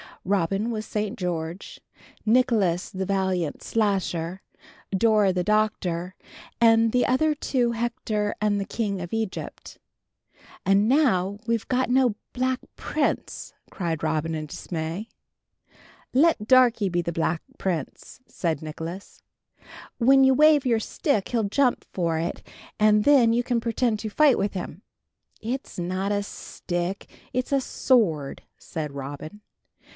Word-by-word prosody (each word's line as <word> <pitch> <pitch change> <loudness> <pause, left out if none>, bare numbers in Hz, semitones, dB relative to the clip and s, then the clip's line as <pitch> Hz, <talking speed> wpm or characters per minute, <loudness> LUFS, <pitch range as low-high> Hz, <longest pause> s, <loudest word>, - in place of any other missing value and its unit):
Robin 195 +3 0
was 220 -2 -3
St. 210 +2 -3
George, 175 -1 -4 0.5
Nicholas 215 -7 +2
the 190 0 -3
valiant 190 -5 -1
Slasher, 190 -5 -1 0.5
Dora 210 -1 +3
the 180 -1 0
Doctor, 185 -4 0 0.4
and 225 -1 +5
the 250 +1 +2
other 305 +5 +2
two 255 -4 0
Hector 225 -3 -2
and 210 -1 +1
the 200 - -2
King 200 -5 -2
of 175 +2 -7
Egypt. 220 -3 -5 0.8
"And 195 +2 +3
now 205 -8 +2
we've 230 -1 0 0.2
no 250 -3 +3 0.2
Black 255 0 0 0.2
Prince!" - - -2 0.2
cried 165 -5 -3
Robin 160 +1 0
in 155 -1 -4
dismay. 165 +6 -5 1.1
"Let 270 -6 +3
Darkie 245 -5 +5
be 175 -1 0
the 170 - -2
Black 165 0 -1 0.2
Prince," 175 - -4
said 165 -4 -2
Nicholas. 165 +4 -8 0.7
"When 270 +2 +5
you 265 0 +6
wave 300 -1 +5
your 230 -2 +3
stick 220 - -1
he'll 235 -3 0
jump 255 +2 +2
for 170 -3 0
it, 170 +2 -3 0.4
and 210 0 +4
then 255 -6 +5
you 240 +1 +1
can 245 -1 0
pretend 230 -1 0
to 215 - -4
fight 285 +3 +4
with 200 +1 -1
him." 180 -2 -6 0.6
"It's 250 +5 -5
not 185 +3 -2
a 205 0 +1
stick, 175 -1 -5 0.3
it's 255 +2 -2
a 275 -1 +3
sword," 180 - +1
said 155 -3 -5
Robin. 145 +8 -7
205 Hz, 130 wpm, -25 LUFS, 175-235 Hz, 1.1 s, you